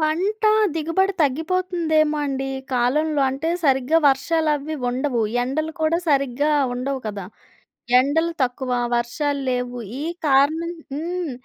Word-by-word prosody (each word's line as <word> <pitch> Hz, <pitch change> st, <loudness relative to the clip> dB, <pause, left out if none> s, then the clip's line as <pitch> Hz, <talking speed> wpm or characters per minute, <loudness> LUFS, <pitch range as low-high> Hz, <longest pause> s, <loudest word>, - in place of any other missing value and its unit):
పంటా 390 Hz, +8 st, +1 dB, 0.2 s
దిగుబడి 330 Hz, +5 st, +1 dB
తగ్గిపోతుందేమో 315 Hz, +1 st, +1 dB
అండి 270 Hz, -1 st, -2 dB
ఈ -, -, -8 dB
కాలంలో. 290 Hz, +5 st, +1 dB
అంటే, 280 Hz, +5 st, -3 dB, 0.2 s
సరిగ్గా 270 Hz, +3 st, +3 dB
వర్షాలవీ 300 Hz, +1 st, 0 dB, 0.2 s
ఉండవు. 250 Hz, -1 st, -1 dB, 0.2 s
ఎండలు 310 Hz, +5 st, -2 dB
కూడా 325 Hz, +2 st, +2 dB
సరిగ్గా 275 Hz, 0 st, +1 dB, 0.2 s
ఉండవు 265 Hz, +2 st, -3 dB
కదా! 200 Hz, -3 st, -5 dB, 0.8 s
ఎండలు 320 Hz, +5 st, +1 dB
తక్కువ, 255 Hz, +1 st, -3 dB, 0.3 s
వర్షాల్లేవు. 250 Hz, -1 st, -2 dB, 0.2 s
ఈ -, -, -3 dB, 0.2 s
కారణం 310 Hz, +5 st, +2 dB, 0.2 s
హ్మ్. 340 Hz, 0 st, -3 dB
295 Hz, 110 wpm, -22 LUFS, 265-320 Hz, 0.8 s, సరిగ్గా